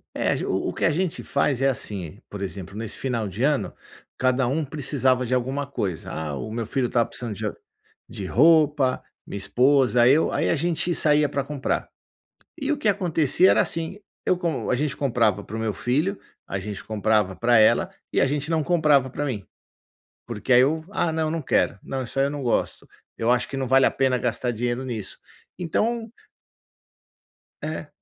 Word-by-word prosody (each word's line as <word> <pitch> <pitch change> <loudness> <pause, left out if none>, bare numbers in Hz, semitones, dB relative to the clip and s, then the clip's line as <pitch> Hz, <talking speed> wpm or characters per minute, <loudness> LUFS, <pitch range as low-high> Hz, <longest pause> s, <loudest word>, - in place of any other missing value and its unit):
É. - - 0
A - - +1
ge - - -3
o 95 - -1
o - - -4
que - - -1
a 165 - +4
gente 180 +2 -2
faz 135 -3 0
é 135 - +4
assim: 100 - -4
por 105 - -7
exemplo 100 0 -6
nesse 110 -1 -4
final 120 -5 -2
de 100 +6 -4
ano, 145 -1 +1 0.4
cada 130 0 +2
um 150 +6 0
precisava 130 -3 0
de 125 - -2
alguma 130 +3 -1
coisa, 100 - -4
ah 75 -3 -4
o 110 - -6
meu 115 0 -3
filho 125 +2 0
estava 120 -1 +1
precisando 120 -3 -6
de - - -3 0.6
de 100 -4 -7
roupa, 145 - +4 0.2
minha - - -6
esposa, 125 +2 +3
eu. 145 +5 +4
Aí - - 0
a - - +3
gente 170 +2 -1
saía 150 -2 +3
pra 140 -1 -1
comprar. 140 -1 -2 0.7
E 280 -1 -2
o 295 - -1
que 225 - 0
acontecia 180 -3 +3
era - - +4
assim: 165 +4 -2 0.3
eu 185 - +2
como 160 -10 -2
a 125 - +2
gente 145 +1 -1
comprava 110 -7 +1
pro 110 - -6
meu 110 -3 -1
filho, 150 - 0 0.3
a 100 - -3
gente 100 +1 -6
comprava 105 -3 +1
pra 120 0 +4
ela 110 - +4 0.2
e - - +2
a - - +4
gente 145 +3 -2
não 160 -2 +2
comprava 150 -6 +3
pra 145 +3 -3
mim 110 -8 -4 0.8
porque 120 +1 -1
aí 125 - +8
eu 155 +4 +1
"Ah 170 -5 0
não, 160 -1 0
não 165 - -2
quero". 130 - +1
"Não, 135 -1 -3
isso 130 +3 -4
aí 135 - +3
eu - - -2
não 145 -2 -5
gosto". 120 - -1 0.3
"Eu 115 +2 +1
acho 125 0 +2
que 135 - -5
não 130 -1 -2
vale 135 +1 +5
a - - 0
pena 130 -2 +1
gastar 120 +1 -1
dinheiro 120 +2 -2
nisso". 110 -6 -5 0.4
Então 225 +7 -1 1.5
É. - - -4
130 Hz, 195 wpm, -24 LUFS, 115-150 Hz, 1.5 s, aí